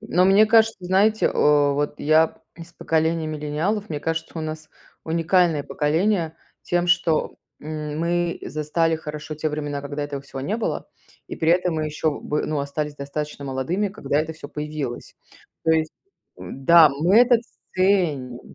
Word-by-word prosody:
Но, 195 -4 +1
мне 195 +3 +6
кажется, 225 0 +4
знаете, 195 +4 +2
э, - - 0 0.4
вот 145 +1 -2
я 155 +2 +3 0.2
с 170 0 -12
поколения 160 0 0
миллениалов, 155 +8 -2
мне 150 - -3
кажется, 165 +2 -3
у - - -3
нас 155 0 -6 0.4
уникальное 165 -1 +2
поколение 165 +4 0 0.3
тем, 175 0 0
что, 170 -3 +1 0.2
м, 150 0 -5
мы 170 +1 0
застали 160 +2 0
хорошо 150 0 -7
те 155 +1 -2
времена, 145 -1 -3
когда 145 +1 -4
этого 145 -1 -6
всего 135 -1 -8
не 200 +11 -2
было, 230 - -3 0.4
и - - -7
при 160 - +1
этом 180 0 +2
мы 155 -1 -1
еще 155 0 -2
бы 150 - -2
ну, 155 -2 -1
остались 145 +1 -4
достаточно 145 +1 -5
молодыми, 140 +10 -1
когда 190 -7 -1
это 160 +1 -4
всё 155 -2 -11
появилось. 150 -4 -5 0.5
То 165 - +3
есть 160 -1 0 0.4
да, 160 +4 +5
мы 155 +8 +2
это 245 0 +6 0.4
ценим, 170 -10 +1
155 Hz, 160 wpm, -23 LUFS, 150-175 Hz, 0.5 s, мне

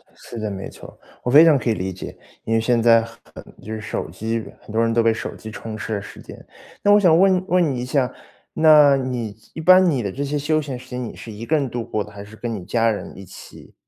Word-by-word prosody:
是 120 - -11
的， 110 -1 -3
没 95 0 -6
错， - - -14 0.3
我 125 - -1
非 150 +4 +9
常 155 -4 +5
可 125 - -2
以 110 - +3
理 95 0 -4
解。 95 - -9 0.3
因 115 - -2
为 115 - +3
现 120 0 +1
在 115 0 +5
很 115 - -9 0.5
就 110 - -6
是 110 - -5
手 110 -6 -4
机 110 +5 -3 0.2
很 - - -13
多 115 +1 +1
人 115 0 +1
都 115 - +3
被 115 -1 +3
手 - - -6
机 110 - -10
充 110 0 -7
斥 110 0 -4
了 100 - -3
时 - - -12
间。 - - -13 0.4
那 205 - +3
我 205 - +6
想 170 -5 +5
问 185 -1 +3
问 180 -5 +2
你 120 - -4
一 - - -4
下， 130 -2 0 0.4
那 150 -3 +6
你 120 -5 -4 0.2
一 160 - -6
般 185 +2 +6
你 135 -6 0
的 100 - -3
这 140 +8 -4
些 145 +1 -2
休 155 +2 0
闲 140 -4 -6
时 125 - -14
间， 125 0 -4
你 115 - -7
是 115 - -10
一 110 +3 -8
个 160 - +1
人 135 -4 -1
度 120 0 -4
过 105 -2 -3
的？ 105 - -14
还 100 -1 -10
是 105 +2 -13
跟 115 0 -5
你 95 -4 -6
家 115 +3 +1
人 105 -3 -5
一 95 - -10
起？ 90 - -14
115 Hz, 295 characters per minute, -21 LUFS, 110-145 Hz, 0.5 s, 非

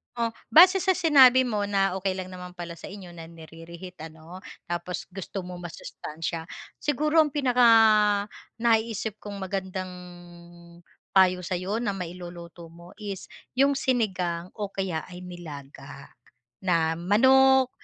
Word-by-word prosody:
Oh, 235 -1 0 0.2
base 365 +4 +8
sa 380 0 +2
sinabi 265 -7 +6
mo 215 -5 -1
na 195 -2 0
okey 190 0 -1
lang 185 0 -6
naman 180 -1 -9
pala 170 -1 -8
sa - - -10
inyo 195 -2 -10
na 170 -1 -10
nire-reheat, 165 +2 -12 0.2
ano? 160 +3 -12 0.3
Tapos 175 +1 -4
gusto 195 +1 -6
mo 180 0 -8
masustansiya. 165 -1 -6 0.3
Siguro 300 +2 0
ang 305 -3 +4
pinakanaiisip 225 -3 +2
kong 205 -1 -8
magandang 190 -1 -4 1.2
payo 185 -1 +5
sa'yo 185 +5 -3
na 200 -5 -2
mailuluto 175 -1 -9
mo 170 +1 -15
is 200 -3 -6 0.3
'yong 275 +1 +4
sinigang 185 -10 -1
o 205 -2 -5
kaya 190 -5 -3
ay 180 0 -10
nilaga 140 -6 -10 0.5
na 165 -3 0
manok. 260 +7 +4
190 Hz, 130 wpm, -26 LUFS, 175-225 Hz, 1.2 s, base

